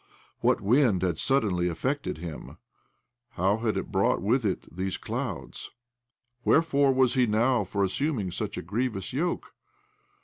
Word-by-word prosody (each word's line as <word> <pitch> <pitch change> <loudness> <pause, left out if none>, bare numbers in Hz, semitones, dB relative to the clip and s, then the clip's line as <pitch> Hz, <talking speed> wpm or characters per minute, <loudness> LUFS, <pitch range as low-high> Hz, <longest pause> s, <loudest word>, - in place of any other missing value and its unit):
What - - +2
wind 110 -3 +3
had 85 -4 0
suddenly 100 -10 +2
affected 130 - -2
him? 80 -2 -8 0.8
How 95 +4 +2
had 110 -1 -1
it - - -4
brought 95 0 +2
with 115 +7 +1
it 95 - -1
these 95 +1 -2
cloud's? - - -5 0.7
Where 160 - +4
fore 140 -4 +3
was 130 -2 +3
he 125 -2 +3
now 115 +2 +2
for 100 +1 -1
assuming 105 - -1
such - - -4
a - - -4
grievous 105 +1 -2
yoke? 170 +6 -2
110 Hz, 145 wpm, -27 LUFS, 95-130 Hz, 0.8 s, Where